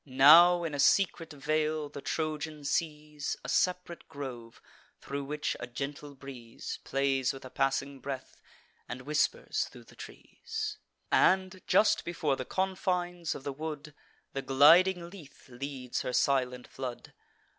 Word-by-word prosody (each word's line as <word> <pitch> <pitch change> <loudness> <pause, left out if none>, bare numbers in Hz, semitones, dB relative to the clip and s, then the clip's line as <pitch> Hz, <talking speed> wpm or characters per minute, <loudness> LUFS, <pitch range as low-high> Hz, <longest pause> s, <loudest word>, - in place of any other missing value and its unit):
Now, 160 +6 +7
in 165 -3 -3
a 145 - -4
secret 165 +1 +3
vale, 155 +1 -1
the 145 -1 -9
Trojan 155 0 -3
sees 150 -1 -2
A - - -5
sep'rate 180 -2 -1
grove, 125 -5 -8 0.4
thro' 140 +1 -5
which 150 +2 -3
a 120 - -5
gentle 140 +3 -6
breeze 125 -4 -8
Plays 135 -1 0
with 135 -1 -10
a 130 - -10
passing 135 0 -1
breath, 130 0 -7 0.5
and 125 +1 -6
whispers 150 +1 0
thro' - - -13
the - - -18
trees; 435 -2 -7 0.3
And, 185 0 +3
just 215 - +4
before 155 -5 -1
the 130 - -5
confines 180 -2 -1
of 135 - -8
the 140 - -4
wood, 150 0 -6 0.4
The 135 - -2
gliding 170 +7 +5
Lethe 165 -8 -14
leads 130 0 -5
her 125 - -3
silent 125 -2 +1
flood. 130 -2 -7
145 Hz, 140 wpm, -30 LUFS, 135-170 Hz, 0.5 s, Now